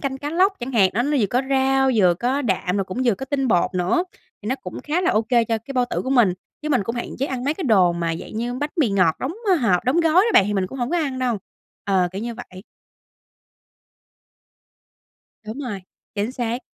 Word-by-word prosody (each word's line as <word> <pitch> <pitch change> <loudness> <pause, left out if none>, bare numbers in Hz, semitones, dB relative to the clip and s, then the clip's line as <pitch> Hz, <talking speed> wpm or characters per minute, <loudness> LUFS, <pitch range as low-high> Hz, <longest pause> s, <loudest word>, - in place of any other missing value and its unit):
canh 270 -1 -3
cá 290 +2 -4
lóc 370 +5 +3
chẳng 250 +2 -5
hạn. 195 -6 +4
Đó, 235 - +2
nó 290 +3 0
vừa 210 - +3
có 245 +6 0
rau, 270 0 +3
vừa 180 -5 +4
có 255 +8 -1
đạm, 190 -5 -1
rồi 195 - 0
cũng 185 +7 -4
vừa 235 -5 +3
có 265 - -7
tinh 270 -1 -1
bột 180 -2 +2
nữa, 180 - +1 0.4
thì 210 - -5
nó 255 - +1
cũng 180 -8 -8
khá 310 +4 0
là 365 - +2
ô 215 - +2
kê 235 +1 +2
cho 225 0 -1
cái 230 +5 -9
bao 250 -2 +2
tử - - -1
của 260 - -4
mình. 240 -8 +4 0.3
Chứ 305 - -3
mình 260 -8 +2
cũng 230 +4 -3
hạn 240 - -4
chế 270 - 0
ăn 255 -3 -4
mấy 290 +3 0
cái 360 - -5
đồ 190 -8 +4
mà 170 -1 -2
dạng 195 - -9
như 240 +2 -2
bánh 290 +4 -3
mì 250 -8 +2
ngọt 185 -5 +2
đóng, 265 - -2 0.2
ờ, 380 - +6
hộp, 225 - +1
đóng 260 +7 +2
gói 325 -2 +2
đó 390 +6 +5
bạn, - - +7
thì 210 - -2
mình 190 -2 0
cũng 265 +8 -9
hổng 245 0 -2
có 350 - +1
ăn 275 -5 -2
đâu. 245 -4 0 0.5
Ờ, 190 -3 +2
kiểu 195 +3 -5
như 235 0 -4
vậy. 190 -6 -11 2.8
Đúng 220 +5 -7
rồi. 240 -9 -5 0.3
Chính 210 +4 -2
xác. 240 0 -3
245 Hz, 250 wpm, -22 LUFS, 200-270 Hz, 2.8 s, bạn